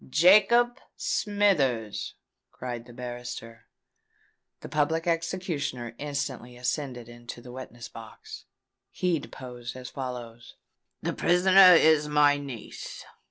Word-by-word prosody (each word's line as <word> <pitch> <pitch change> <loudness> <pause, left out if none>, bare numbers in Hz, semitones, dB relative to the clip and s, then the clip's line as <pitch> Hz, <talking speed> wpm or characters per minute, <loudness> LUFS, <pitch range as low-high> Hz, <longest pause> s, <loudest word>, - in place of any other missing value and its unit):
"Jacob 215 - +5 0.2
Smithers!" 150 - 0 0.4
cried 120 -2 -6
the - - -12
barrister. 120 -2 -8 0.9
The - - -7
Public 155 +2 0
Executioner 165 -8 -2
instantly 135 -4 -4
ascended 125 -1 -3
into 120 0 -10
the 125 +1 -11
witness 120 -2 -9
box. 110 -2 -11 0.4
He 180 -3 0
deposed 125 -3 -8
as 130 0 -8
follows: 120 -3 -7 0.5
"The - - -1
prisoner 185 +1 +7
is 155 -2 +5
my 150 -1 +4
niece. 135 -5 -8
130 Hz, 105 wpm, -27 LUFS, 120-165 Hz, 0.9 s, prisoner